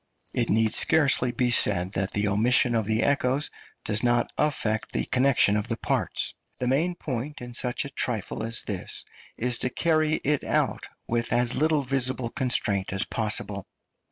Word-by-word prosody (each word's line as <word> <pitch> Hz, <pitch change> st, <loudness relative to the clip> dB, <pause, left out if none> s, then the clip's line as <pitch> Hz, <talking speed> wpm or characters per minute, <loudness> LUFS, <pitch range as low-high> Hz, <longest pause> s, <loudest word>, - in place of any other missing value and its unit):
It -, -, 0 dB
need 110 Hz, +1 st, +2 dB
scarcely 140 Hz, -5 st, +4 dB
be 125 Hz, 0 st, 0 dB
said 95 Hz, -5 st, +4 dB
that 95 Hz, 0 st, -2 dB
the 105 Hz, 0 st, 0 dB
omission 120 Hz, +4 st, +4 dB
of 110 Hz, -2 st, 0 dB
the 110 Hz, +1 st, 0 dB
echoes 140 Hz, +1 st, +1 dB, 0.3 s
does 110 Hz, +1 st, +3 dB
not 120 Hz, -1 st, +1 dB
affect 110 Hz, -7 st, -1 dB
the -, -, -1 dB
connection 125 Hz, -5 st, +2 dB
of 105 Hz, -, -2 dB
the -, -, -3 dB
parts. -, -, -2 dB, 0.2 s
The 125 Hz, -, -3 dB
main 155 Hz, +8 st, 0 dB
point 140 Hz, -1 st, -5 dB
in 120 Hz, 0 st, -9 dB
such 125 Hz, +2 st, -1 dB
a -, -, -6 dB
trifle 110 Hz, -7 st, -3 dB
as 115 Hz, 0 st, -1 dB
this 95 Hz, -4 st, -5 dB, 0.3 s
is 125 Hz, +1 st, 0 dB
to 125 Hz, -, +1 dB
carry 155 Hz, +2 st, +1 dB
it 145 Hz, 0 st, 0 dB
out -, -, -1 dB, 0.2 s
with 120 Hz, 0 st, -2 dB
as 120 Hz, 0 st, +1 dB
little 155 Hz, -1 st, +1 dB
visible 130 Hz, -2 st, -2 dB
constraint 115 Hz, -8 st, 0 dB
as 95 Hz, 0 st, +2 dB
possible. 105 Hz, -3 st, 0 dB
120 Hz, 170 wpm, -25 LUFS, 110-135 Hz, 0.3 s, scarcely